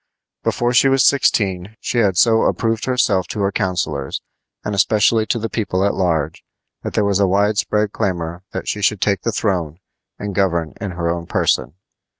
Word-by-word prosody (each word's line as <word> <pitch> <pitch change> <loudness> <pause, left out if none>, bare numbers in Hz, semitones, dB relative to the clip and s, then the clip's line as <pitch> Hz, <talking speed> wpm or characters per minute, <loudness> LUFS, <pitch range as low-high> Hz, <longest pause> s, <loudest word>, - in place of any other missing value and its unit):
Before 120 0 0
she 135 +2 +5
was 135 0 +3
sixteen 100 -7 +1
she 120 - -1
had 100 -5 +2
so 110 +2 +4
approved 115 -1 0
herself 115 -7 +1
to 105 - -4
her 100 0 +1
counselors, 85 -9 -2 0.4
and 105 - -2
especially 110 +2 +3
to - - 0
the 115 0 -2
people 100 -4 -1
at 100 - +1
large, 80 -5 -1 0.4
that - - -5
there 105 - +2
was 100 -1 +1
a 100 - +3
wide 100 +3 +2
spread 105 -2 0
clamor 85 -3 -3
that - - -5
she 105 - -2
should 105 0 +2
take 100 0 +1
the 115 - -1
throne 90 -8 -1 0.4
and 100 -1 -5
govern 85 -5 0
in 100 - -3
her 85 -1 -2
own 85 0 -2
person. 75 - 0
100 Hz, 185 wpm, -19 LUFS, 90-110 Hz, 0.4 s, she